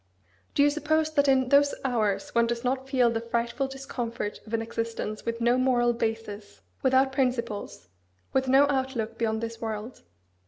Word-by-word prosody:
Do 285 Hz, -, +5 dB
you 290 Hz, -, +4 dB
suppose 310 Hz, +1 st, 0 dB
that 285 Hz, -2 st, +3 dB
in 260 Hz, -2 st, +3 dB
those 285 Hz, +1 st, +4 dB
hours 240 Hz, +3 st, 0 dB
one 235 Hz, 0 st, +3 dB
does 235 Hz, 0 st, -2 dB
not 260 Hz, +1 st, -1 dB
feel 250 Hz, -3 st, +3 dB
the 225 Hz, 0 st, -2 dB
frightful 235 Hz, +3 st, -1 dB
discomfort 245 Hz, -5 st, -5 dB
of 220 Hz, -, -10 dB
an -, -, 0 dB
existence 230 Hz, -2 st, -4 dB
with 230 Hz, 0 st, -2 dB
no 240 Hz, +2 st, +3 dB
moral 240 Hz, -2 st, +3 dB
basis, 220 Hz, -, -4 dB, 0.2 s
without 265 Hz, +1 st, +3 dB
principles, 245 Hz, -, -2 dB, 0.5 s
with 265 Hz, 0 st, +1 dB
no 270 Hz, +2 st, +6 dB
outlook 260 Hz, -5 st, -2 dB
beyond 220 Hz, -1 st, 0 dB
this 230 Hz, 0 st, -5 dB
world? 220 Hz, +2 st, -5 dB
240 Hz, 165 wpm, -27 LUFS, 230-265 Hz, 0.5 s, no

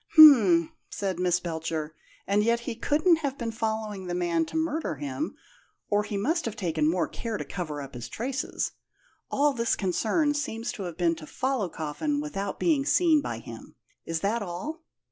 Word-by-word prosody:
"H'm," 220 Hz, -, +8 dB, 0.2 s
said 190 Hz, -3 st, -3 dB
Miss 180 Hz, -1 st, +2 dB
Belcher; 160 Hz, -2 st, -3 dB, 0.3 s
"and 205 Hz, +1 st, +2 dB
yet 235 Hz, +1 st, +2 dB
he 235 Hz, -, -4 dB
couldn't 310 Hz, +8 st, +3 dB
have 280 Hz, -3 st, -3 dB
been 230 Hz, -2 st, -3 dB
following 220 Hz, -3 st, -3 dB
the 175 Hz, -, -2 dB
man 170 Hz, -2 st, +1 dB
to -, -, -4 dB
murder 320 Hz, -, -1 dB
him, 140 Hz, -2 st, -4 dB, 0.6 s
or 205 Hz, 0 st, +4 dB
he 210 Hz, -1 st, -4 dB
must 320 Hz, -, 0 dB
have 225 Hz, -2 st, -3 dB
taken 165 Hz, -8 st, +1 dB
more 170 Hz, 0 st, +1 dB
care 225 Hz, -2 st, -4 dB
to -, -, -5 dB
cover 155 Hz, -6 st, -4 dB
up 135 Hz, -, -10 dB
his 120 Hz, -1 st, -7 dB
traces. 260 Hz, -, -2 dB, 0.6 s
All 290 Hz, 0 st, +2 dB
his 230 Hz, -1 st, +1 dB
concern 225 Hz, -, +1 dB
seems 235 Hz, -6 st, -3 dB
to 200 Hz, -, -6 dB
have 170 Hz, -2 st, -6 dB
been 170 Hz, -2 st, +2 dB
to 155 Hz, -2 st, -10 dB
follow 260 Hz, -7 st, -1 dB
Coffin 165 Hz, -, -2 dB
without 200 Hz, -10 st, -4 dB
being 310 Hz, -5 st, +3 dB
seen 315 Hz, +1 st, +4 dB
by -, -, -4 dB
him. -, -, -10 dB, 0.3 s
Is 165 Hz, -1 st, -3 dB
that 225 Hz, +4 st, 0 dB
all?" 205 Hz, -, -5 dB
210 Hz, 185 wpm, -27 LUFS, 170-275 Hz, 0.6 s, H'm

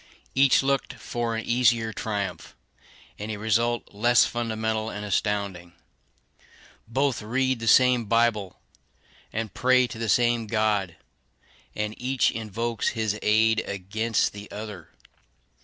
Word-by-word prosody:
Each 135 Hz, 0 st, +4 dB
looked 140 Hz, 0 st, 0 dB
for 120 Hz, -1 st, -3 dB
an 115 Hz, -, -4 dB
easier 120 Hz, -2 st, +2 dB
triumph, 100 Hz, -6 st, -4 dB, 0.6 s
and 105 Hz, +1 st, -4 dB
a 110 Hz, -, -4 dB
result 115 Hz, +3 st, 0 dB
less 120 Hz, +4 st, +4 dB
fundamental 110 Hz, -2 st, -2 dB
and 105 Hz, -1 st, -6 dB
astounding. 100 Hz, -3 st, -2 dB, 1.1 s
Both 135 Hz, +2 st, 0 dB
read 130 Hz, +3 st, 0 dB
the 115 Hz, -, -5 dB
same 125 Hz, 0 st, +5 dB
Bible, 110 Hz, -4 st, +1 dB, 0.7 s
and 110 Hz, -1 st, -4 dB
pray 130 Hz, 0 st, +3 dB
to 115 Hz, -1 st, -8 dB
the 115 Hz, -1 st, -2 dB
same 120 Hz, 0 st, +2 dB
God; 105 Hz, -5 st, 0 dB, 0.8 s
and 105 Hz, 0 st, -2 dB
each 130 Hz, 0 st, +1 dB
invokes 115 Hz, +1 st, -3 dB
his 110 Hz, -1 st, -1 dB
aid 110 Hz, +1 st, +3 dB
against 105 Hz, +4 st, -1 dB
the 100 Hz, 0 st, -10 dB
other. 105 Hz, -5 st, -8 dB
110 Hz, 125 wpm, -25 LUFS, 105-120 Hz, 1.1 s, same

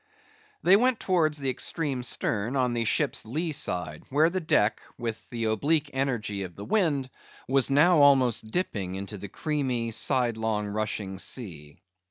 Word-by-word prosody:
They 185 Hz, -, +7 dB
went 250 Hz, +1 st, +2 dB
towards 160 Hz, -5 st, +1 dB
the 135 Hz, -2 st, 0 dB
extreme 140 Hz, 0 st, -2 dB
stern, 115 Hz, 0 st, 0 dB
on 125 Hz, -2 st, +1 dB
the 115 Hz, -1 st, -1 dB
ship's 140 Hz, +5 st, +1 dB
lee 155 Hz, +9 st, -2 dB
side, 90 Hz, -, -2 dB
where 155 Hz, +5 st, +3 dB
the 185 Hz, -, -1 dB
deck, 110 Hz, -9 st, +2 dB, 0.2 s
with 115 Hz, -2 st, -5 dB
the 115 Hz, -2 st, -4 dB
oblique 145 Hz, +8 st, +1 dB
energy 120 Hz, -7 st, -2 dB
of 90 Hz, -3 st, -7 dB
the 100 Hz, -, -8 dB
wind, 145 Hz, -, +1 dB, 0.4 s
was 135 Hz, 0 st, +2 dB
now 155 Hz, +5 st, +5 dB
almost 130 Hz, -6 st, +4 dB
dipping 100 Hz, -, -2 dB
into 100 Hz, +1 st, -6 dB
the 100 Hz, -, -7 dB
creamy, 130 Hz, -, -2 dB
sidelong 110 Hz, -3 st, 0 dB
rushing 105 Hz, -2 st, -3 dB
sea. 80 Hz, -, -6 dB
125 Hz, 155 wpm, -27 LUFS, 105-145 Hz, 0.4 s, They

